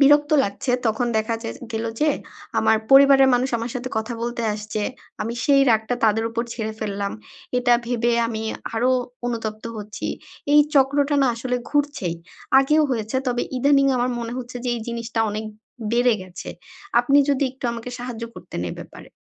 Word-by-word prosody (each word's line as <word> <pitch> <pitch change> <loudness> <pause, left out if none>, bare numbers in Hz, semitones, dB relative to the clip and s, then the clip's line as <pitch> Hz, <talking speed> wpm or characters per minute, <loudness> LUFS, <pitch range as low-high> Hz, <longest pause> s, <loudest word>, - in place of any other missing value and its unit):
বিরক্ত 290 +2 +5
লাগছে। 200 +6 -3 0.2
তখন 225 +2 +1
দেখা 225 +1 -1
যা 225 - -4 0.2
গেল 225 +1 -2 0.2
যে 300 0 +4 0.5
আমার 220 - +4
পরিবারের 270 0 +8
মানুষ 255 +2 +1
আমার 230 +1 -4
সাথে 250 0 -3
কথা 220 +2 -3
বলতে 235 0 -3
আসছে। 210 0 -4 0.4
আমি 230 +2 -3
সেই 275 -1 +5
রাগটা 220 +2 +2
তাদের 220 +1 +3
উপর 235 +1 -1
ঝেড়ে 220 -2 -3
ফেললাম। 200 -1 -2 0.5
এটা 245 -1 +3
ভেবে 240 0 +1
আমি 220 -1 -4 0.3
আরো 240 +3 +2 0.4
অনুতপ্ত 220 -2 -4
হচ্ছি। 210 0 -6 0.5
এই 295 - +8
চক্রটা 280 +1 +3
না - - +4
আসলে 250 +2 -2
ঘুরছেই। 290 - 0 0.4
আগেও 300 +3 +4
হয়েছে 225 0 -2
তবে 245 -1 0
ইদানিং 275 +2 +4
আমার 245 +1 +1
মনে 230 0 -4
হচ্ছে 250 0 -7
যে - - -1
এই 235 - -4
জিনিসটা 235 -1 -3
অনেক 215 +1 -4 0.5
বেড়ে 245 0 +4
গেছে। 185 -1 -9 0.5
আপনি 275 +4 +4
যদি 280 0 +2
একটু 260 0 -14
আমাকে 235 +1 -6
সাহায্য 240 -2 -6
করতেন 175 - -7
এই - - -5
ব্যাপারে। - - -11
240 Hz, 170 wpm, -23 LUFS, 220-270 Hz, 0.5 s, পরিবারের